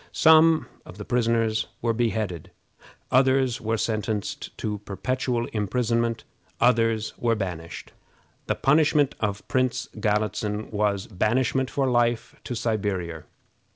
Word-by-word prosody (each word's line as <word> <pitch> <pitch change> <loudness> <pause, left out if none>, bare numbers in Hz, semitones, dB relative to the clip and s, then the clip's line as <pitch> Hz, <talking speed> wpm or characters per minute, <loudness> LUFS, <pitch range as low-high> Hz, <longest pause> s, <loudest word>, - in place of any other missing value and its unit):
Some 160 0 +5 0.2
of 90 - -12
the 105 - -7
prisoners 115 -2 +1
were 115 -1 0
beheaded; 110 -7 -2 0.6
others 130 -1 +3
were 110 +1 -1
sentenced 110 -1 -3
to 105 -1 -3
perpetual 120 +4 -2
imprisonment; 115 +2 0 0.4
others 115 -2 +2
were 115 -1 +2
banished. 90 -5 -6 0.6
The - - +1
punishment 150 0 +3
of 100 -2 -3
Prince 125 -1 0
Galitzin 105 0 -1
was 105 -2 0
banishment 120 +5 0
for 135 -1 0
life 120 -2 +1
to 125 - -4
Siberia. 95 -8 -2
115 Hz, 115 wpm, -25 LUFS, 105-125 Hz, 0.6 s, Some